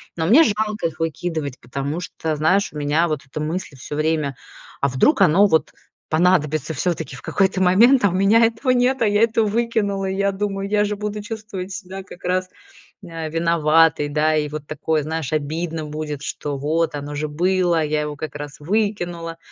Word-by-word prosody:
Но 160 -1 -1
мне 265 - +7
жалко 215 - -1
их 165 - -10
выкидывать. 160 -3 -3
Потому 140 +6 -4
что, 160 -3 -3
знаешь, 185 +7 +2
у - - -9
меня 150 +3 +1
вот 155 -3 -2
эта 135 +3 -7
мысль 160 0 -4
всё 145 - -7
время: 155 -2 0 0.4
"А 140 - +2
вдруг 165 - +3
оно 190 +4 +5
вот 160 -4 +1 0.4
понадобится 155 -2 +2
всё-таки 160 +1 -2
в - - -12
какой-то 190 -1 +1
момент, 225 +7 +5
а - - +5
у - - -4
меня 200 +5 +4
этого 230 +4 -1
нет, 255 +1 +2
а 225 - +4
я 205 +1 +2
это 230 0 +2
выкинула?" 210 -3 0
Я 195 +1 0
думаю, 195 0 -3
я 210 0 +2
же 210 0 -2
буду 210 0 -4
чувствовать 210 -3 -6
себя 190 0 -7
как 180 - -14
раз, 185 +1 0 0.6
э, 165 -2 -5
виноватой, 165 -2 +3
да. 155 +1 +2
И 150 -1 0
вот 150 0 -6
такое, 155 0 -1
знаешь, 155 -1 -3
обидно 155 +2 -2
будет, 150 -1 -5
что: 145 -1 -4
"Вот 155 +3 0
оно 145 0 -5
же 150 +1 -2
было, 175 +1 +1
я 150 0 0
его 150 0 -4
как 145 -1 -7
раз 145 0 -8
выкинула". 175 -3 -2
165 Hz, 190 wpm, -21 LUFS, 150-200 Hz, 0.6 s, мне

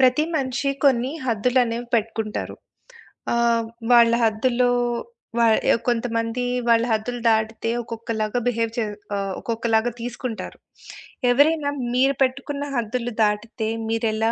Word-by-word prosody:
ప్రతి 260 +3 +4
మనిషి 270 0 -1
కొన్ని 255 -1 +3 0.2
హద్దులనేవి 240 +1 +1
పెట్టుకుంటారు. 220 -1 -2 0.8
ఆహ్, 235 -1 +2 0.3
వాళ్ళ 235 -1 +7
హద్దుల్లో 240 +3 +2 0.7
వ - - +4 0.3
ఆహ్, - - +1
కొంతమంది 230 0 0 0.2
వాళ్ళ 230 0 +5
హద్దులు 240 +3 -2
దాటితే 220 0 0
ఒక్కొక్కలాగా 225 0 -3
బిహేవ్ 230 -2 0
చే 235 - +1 0.3
ఆహ్, 195 -1 -2
ఒక్కొక్కలాగా 230 0 0
తీసుకుంటారు. 240 -1 -5 0.7
ఎవరైనా 290 +3 +3 0.2
మీరు 270 +2 +3
పెట్టుకున్న 280 +2 -2
హద్దులు 240 +1 -2
దాటితే 215 +2 -1 0.2
మీరెలా 225 0 0
235 Hz, 110 wpm, -23 LUFS, 225-250 Hz, 0.8 s, వాళ్ళ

